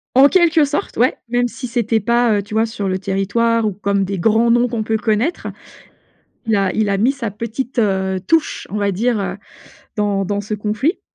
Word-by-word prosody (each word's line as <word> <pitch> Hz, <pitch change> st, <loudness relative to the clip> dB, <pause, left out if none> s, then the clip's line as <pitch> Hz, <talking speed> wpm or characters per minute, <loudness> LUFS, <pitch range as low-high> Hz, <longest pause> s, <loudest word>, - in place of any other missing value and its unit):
En 275 Hz, +2 st, +8 dB
quelque 330 Hz, -3 st, +4 dB
sorte, 290 Hz, +1 st, -3 dB
ouais, 250 Hz, +3 st, +3 dB
même 245 Hz, 0 st, +1 dB
si 250 Hz, +1 st, -7 dB
c'était 230 Hz, -2 st, 0 dB
pas, 235 Hz, +1 st, +2 dB
heu, 200 Hz, -, +1 dB
tu 215 Hz, +2 st, -11 dB
vois? 220 Hz, +1 st, +3 dB
Sur 205 Hz, -3 st, -4 dB
le 185 Hz, -, 0 dB
territoire 205 Hz, +4 st, 0 dB
ou 210 Hz, -, 0 dB
comme 200 Hz, 0 st, 0 dB
des 195 Hz, 0 st, -3 dB
grands 225 Hz, +4 st, +3 dB
noms 240 Hz, +1 st, +3 dB
qu'on 230 Hz, -2 st, -3 dB
peut 220 Hz, 0 st, 0 dB
connaître, 225 Hz, +9 st, -1 dB, 1.0 s
il 220 Hz, -, +2 dB
a 195 Hz, -1 st, +1 dB
il 215 Hz, -1 st, 0 dB
a 195 Hz, -1 st, 0 dB
mis 235 Hz, +6 st, +3 dB
sa 235 Hz, -7 st, -4 dB
petite, 230 Hz, +4 st, -5 dB
heu, 190 Hz, -2 st, 0 dB
touche 325 Hz, -1 st, 0 dB
on 210 Hz, -, -4 dB
va 200 Hz, -1 st, 0 dB
dire, 230 Hz, +3 st, 0 dB
heu, 195 Hz, -, -3 dB, 0.6 s
dans 205 Hz, -2 st, 0 dB
dans 205 Hz, +2 st, -2 dB
ce 210 Hz, +1 st, -5 dB
conflit. 215 Hz, -, -1 dB
220 Hz, 210 wpm, -18 LUFS, 200-240 Hz, 1.0 s, En